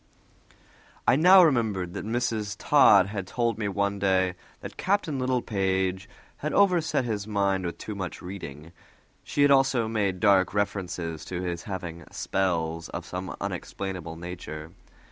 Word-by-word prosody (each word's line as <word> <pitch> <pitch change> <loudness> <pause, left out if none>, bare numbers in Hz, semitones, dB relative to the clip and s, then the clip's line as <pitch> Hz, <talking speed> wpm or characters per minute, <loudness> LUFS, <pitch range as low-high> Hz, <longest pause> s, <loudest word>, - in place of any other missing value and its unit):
I - - +6
now 180 +5 +8
remembered 110 - +1
that - - -5
Mrs. 110 -3 -1
Todd 105 -10 +6
had 100 -2 -5
told 115 -1 -1
me 105 - -1
one 100 0 -1
day 95 -2 +2 0.3
that - - -8
Captain 185 -8 0
Littlepage 95 -7 -1 0.3
had 150 - -3
overset 170 -8 +3
his 105 -3 -3
mind 100 -3 0
with 85 - -6
too 110 - -6
much 95 -3 -5
reading; 85 -4 -8 0.5
she 145 - +1
had 145 - +5
also 135 -4 +3
made 100 -4 -1
dark 95 -1 +3
reference 100 -3 -1
to 85 +1 -5
his 85 -1 -3
having 90 -3 -5
"spells" 85 -4 -1
of - - -6
some 90 +1 -5
unexplainable 90 -4 -5
nature. 85 -2 -7
100 Hz, 145 wpm, -27 LUFS, 90-115 Hz, 0.5 s, now